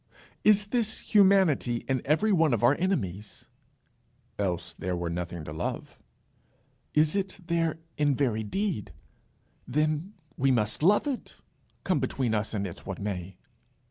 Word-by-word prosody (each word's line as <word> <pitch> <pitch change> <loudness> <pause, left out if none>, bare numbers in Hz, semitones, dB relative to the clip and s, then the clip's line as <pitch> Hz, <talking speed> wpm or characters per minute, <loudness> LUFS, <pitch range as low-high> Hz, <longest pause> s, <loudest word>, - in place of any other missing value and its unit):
"Is 210 -1 +5
this 225 -2 0
humanity 190 - +3
in 130 -2 0
every 160 +10 +2
one 160 -8 +4
of 110 - -4
our 120 - +6
enemies?" 105 - -2 0.9
"Else 90 -3 -2
there 90 0 -3
were 85 -1 -3
nothing 85 -1 -4
to 75 - -7
love." 80 - -5 1.0
"Is 150 +2 +4
it 195 -1 -2
there 165 -2 0 0.2
in 145 -2 +3
very 120 -5 0
deed? 175 - -2 0.7
Then 155 - 0 0.2
we 135 +1 +2
must 110 -3 +1
love 200 - +4
it, 275 -4 -4 0.5
come 185 -6 +1
between 130 -3 -1
us 110 +1 -1
and 100 -1 -1
it 90 - -7
what 95 - -5
may." 95 -2 -4
135 Hz, 140 wpm, -28 LUFS, -, 1.0 s, our